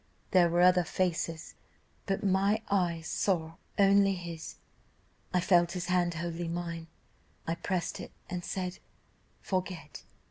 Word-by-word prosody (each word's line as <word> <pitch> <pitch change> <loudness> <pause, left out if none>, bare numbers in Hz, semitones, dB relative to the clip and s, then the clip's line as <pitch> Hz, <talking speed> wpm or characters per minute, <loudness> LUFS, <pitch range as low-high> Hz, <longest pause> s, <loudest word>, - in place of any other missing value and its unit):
There 180 -3 +5
were 175 +1 +2
other 180 0 +6
faces, 165 -2 -2 0.5
but 195 +2 -1
my 200 +3 +2
eyes 170 -4 +1
saw 165 -3 0 0.2
only 195 -1 +5
his: 170 -3 -7 0.8
I 180 - +3
felt 175 -1 +4
his 180 -1 -4
hand 175 -2 +2
holding 170 0 -3
mine, 170 -1 -4 0.6
I 165 - 0
pressed 175 +1 -2
it, - - -8 0.2
and 180 -1 -4
said, 180 0 -3 0.6
'Forget. 180 -6 -3
175 Hz, 130 wpm, -31 LUFS, 170-185 Hz, 0.8 s, other